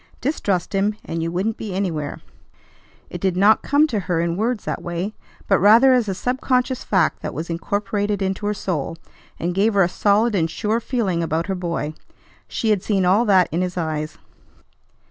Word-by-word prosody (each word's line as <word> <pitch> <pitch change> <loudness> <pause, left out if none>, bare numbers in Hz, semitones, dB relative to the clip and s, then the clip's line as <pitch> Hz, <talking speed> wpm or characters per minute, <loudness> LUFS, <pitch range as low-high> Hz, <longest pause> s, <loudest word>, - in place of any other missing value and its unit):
Distrust 200 - -1
him, 200 +2 +1
and 165 0 -3
you 165 +1 -2
wouldn't 195 +6 -1
be 205 -4 -5
anywhere. 160 -7 -3 0.9
It 175 - -6
did 185 -2 0
not 205 +3 +5
come 290 +2 +3
to 230 -9 -1
her 180 -3 -1
in 170 0 0
words 220 +2 -1
that - - -3
way, 175 +4 -3 0.3
but 195 - +4
rather 230 +7 +7
as 240 -5 +2
a 190 - -2
subconscious 255 +2 0
fact 185 -5 +1
that - - -5
was 165 +3 -4
incorporated 205 +3 -1
into 195 +1 -2
her 210 - +1
soul, 165 -4 -3 0.4
and 175 +1 -1
gave 205 +3 +2
her 195 - +5
a - - +3
solid 210 +5 +2
and 165 -5 +1
sure 215 +6 -1
feeling 220 -8 -1
about 165 0 -1
her 195 - -2
boy. 170 -4 -3 0.5
She 225 - -1
had 205 -3 +2
seen 195 -3 +1
all 200 +6 +4
that 190 -4 +4
in 170 - 0
his 180 -1 -3
eyes. 155 -2 -3
195 Hz, 190 wpm, -21 LUFS, 175-215 Hz, 0.9 s, rather